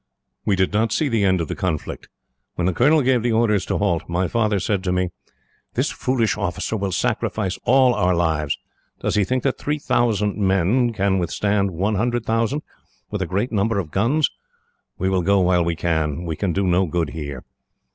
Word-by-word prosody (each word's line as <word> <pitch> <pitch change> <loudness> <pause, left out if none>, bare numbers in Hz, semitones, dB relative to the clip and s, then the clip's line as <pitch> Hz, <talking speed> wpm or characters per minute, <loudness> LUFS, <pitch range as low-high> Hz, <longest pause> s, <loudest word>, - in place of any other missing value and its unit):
"We 100 - +2
did 95 +1 +1
not 110 +1 +1
see 150 +4 +1
the 115 -4 +1
end 95 -2 +3
of 80 - -3
the - - -3
conflict. 90 -6 -4 0.5
When 85 - -1
the 90 - +1
colonel 150 - +4
gave 125 -1 +3
the 120 0 0
orders 105 -4 +2
to - - 0
halt, 85 -6 0
my 90 +2 0
father 110 -2 +1
said 95 +1 -1
to 90 - +1
me: 90 0 0 0.7
"'This - - +1
foolish 125 -4 0
officer 100 +2 -2
will 100 -2 -2
sacrifice 110 -2 -1
all 130 0 +5
our 90 -5 +2
lives. 80 -4 0 0.4
Does - - -1
he 105 - +3
think 130 +5 -1
that 135 - 0
three 150 +1 -1
thousand 110 -7 +1
men 100 +5 +2
can 100 -3 +1
withstand 100 +4 0
one 95 +5 -1
hundred 120 +2 0
thousand, 115 +6 0 0.5
with 105 -2 -3
a 95 - -1
great 100 +8 -1
number 110 0 +1
of 85 -6 -3
guns? 130 - +2 0.7
We 95 - -1
will 95 -1 +1
go 100 +3 +3
while 90 -1 +3
we 85 0 -1
can. 80 -1 -1
We 80 -2 -3
can 95 +2 -1
do 95 +3 0
no 90 +1 +2
good 80 -2 -1
here.' 70 -5 -6
100 Hz, 200 wpm, -22 LUFS, 90-115 Hz, 0.7 s, all